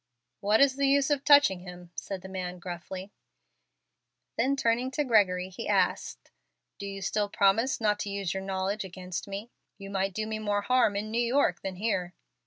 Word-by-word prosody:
"What 210 +2 +3
is 275 -1 +4
the 280 0 +2
use 280 +1 +3
of 285 -1 +1
touching 285 -11 +6
him?" 180 -1 -11
said 190 0 -6
the - - -7
man, 185 -1 -5
gruffly. 185 +2 -7 1.2
Then 275 +1 +2
turning 240 0 +1
to 295 +3 -1
Gregory 190 -7 +3
he 190 - -7
asked, - - 0 0.5
"Do 200 - -5
you 195 -1 -6
still 205 +1 0
promise 205 +7 +2
not 210 -2 +1
to 205 - -3
use 200 -3 -2
your 190 - -3
knowledge 195 +2 -2
against 180 0 -6
me? 200 +4 -6 0.3
You 195 -1 -9
might 195 -1 -1
do 220 - -1
me 220 0 -3
more 205 -1 0
harm 250 -3 +3
in 210 +2 -3
New 235 +2 +1
York 235 -7 +2
than 190 -1 -4
here." 180 -4 -2
200 Hz, 190 wpm, -28 LUFS, 190-230 Hz, 1.2 s, touching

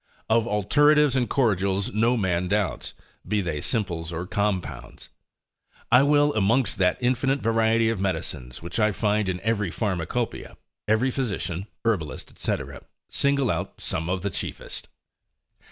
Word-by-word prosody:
Of 115 0 +3
alteratives 145 +7 +4
and 125 -2 +1
cordials 100 -6 +1
no 115 +4 +2
man 90 -3 0
doubts, 100 -2 -1 0.3
be 105 +2 +1
they 85 -6 -2
simples 85 -7 -2
or 85 +1 -4
compounds. 100 -2 -3 0.8
I - - +7
will 145 +1 +4
amongst 110 +4 +2
that 90 -1 +3
infinite 130 +2 +1
variety 115 0 +2
of 110 - -3
medicines, 65 -9 -3
which 85 +6 -4
I 105 -1 +3
find 105 -1 +1
in 90 -1 -2
every 105 -3 0
pharmacopoeia, 100 +5 -3 0.3
every 110 +5 +2
physician, 100 -7 -3 0.2
herbalist, 90 -10 -2
&c., - - 0 0.5
single 140 -4 +2
out - - -4
some 80 +1 -3
of 95 0 -1
the 100 - -1
chiefest. - - -6
105 Hz, 135 wpm, -25 LUFS, 95-120 Hz, 0.8 s, I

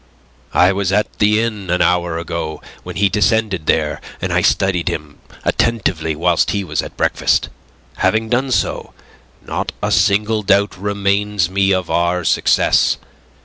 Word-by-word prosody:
"I 90 +2 +5
was 95 -1 -1
at 105 +2 -1
the 105 +1 +3
inn 105 -5 -4
an 90 +1 +1
hour 85 -2 +1
ago 85 -2 -4 0.2
when - - -8
he 100 0 +3
descended 105 -4 0
there, 75 -2 +1 0.2
and - - -2
I - - +2
studied 95 -3 +1
him 75 -1 -6 0.3
attentively 90 -9 0
whilst 85 +2 +1
he 100 -1 -1
was 90 - -2
at - - -10
breakfast. - - +1 0.5
Having 110 0 +1
done 130 +2 0
so, 130 - -2 0.5
not - - -3
a - - -2
single 105 +2 +2
doubt 100 -1 +2
remains 100 -1 -1
me 95 0 +2
of 95 -2 -1
our 85 +1 +1
success. - - +2
95 Hz, 150 wpm, -18 LUFS, 85-105 Hz, 0.5 s, I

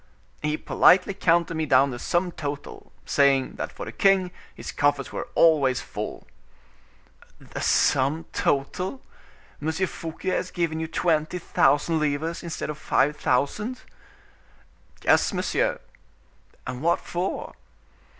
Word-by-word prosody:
"He 150 0 -1
politely 185 +4 +4
counted 170 -3 +2
me 160 -1 -2
down 135 +1 +4
the 120 - -6
sum 175 +5 0
total, 145 -3 -7
saying, 135 -2 +2
that - - -4
for - - -7
the - - -6
king, 195 -2 +3 0.2
his - - -7
coffers 145 -2 0
were - - -5
always 145 -6 +4
full." - - -6 1.1
"The - - -8
sum 140 +5 +2
total! 180 - -1 0.6
M. 155 +2 0
Fouquet 165 0 -3
has 185 0 -1
given 165 -3 -2
you 160 - -3
twenty 160 0 0
thousand 155 0 +2
livres 155 +3 -1
instead 165 -3 -4
of 150 - -9
five 150 0 +2
thousand?" 210 - -1 1.2
"Yes, - - +3
monsieur." - - 0 0.9
"And 130 0 -5
what 170 +2 +2
for?" 180 +2 -4
160 Hz, 125 wpm, -25 LUFS, 145-180 Hz, 1.2 s, politely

